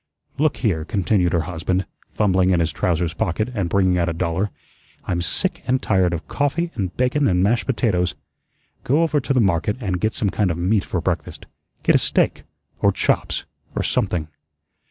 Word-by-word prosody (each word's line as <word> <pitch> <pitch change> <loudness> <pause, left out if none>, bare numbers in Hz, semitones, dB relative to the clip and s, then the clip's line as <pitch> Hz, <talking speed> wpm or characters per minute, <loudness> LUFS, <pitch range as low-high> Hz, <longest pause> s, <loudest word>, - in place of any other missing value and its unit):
"Look 155 0 +2
here," 95 -10 0
continued 95 -1 +1
her 85 - +2
husband, 90 +2 -2 0.2
fumbling 95 -3 +2
in 90 -2 +3
his 85 -1 +1
trousers 85 +2 0
pocket 110 +4 -1
and 100 -7 -1
bringing 95 -2 +2
out 85 0 +1
a - - -2
dollar, 85 +4 -1 0.6
"I'm 85 -1 -1
sick 95 - -1
and 130 +1 +2
tired 95 -6 +2
of 85 -1 -4
coffee 155 +4 -1
and 95 -5 -4
bacon 130 +3 +2
and 90 -1 +2
mashed 115 +4 +1
potatoes. 100 -9 +1 0.7
Go 150 +6 +3
over 155 -3 +2
to 135 - -4
the 130 - +3
market 100 0 +1
and 95 -7 -2
get 110 0 +1
some 100 -3 0
kind 105 -3 +1
of 85 - -2
meat 95 +4 +1
for 90 - -2
breakfast. 85 -4 -3 0.4
Get - - +4
a - - +5
steak, - - +1 0.3
or - - +4
chops, - - 0 0.3
or - - 0
something. 80 -4 0
95 Hz, 185 wpm, -22 LUFS, 85-110 Hz, 0.7 s, a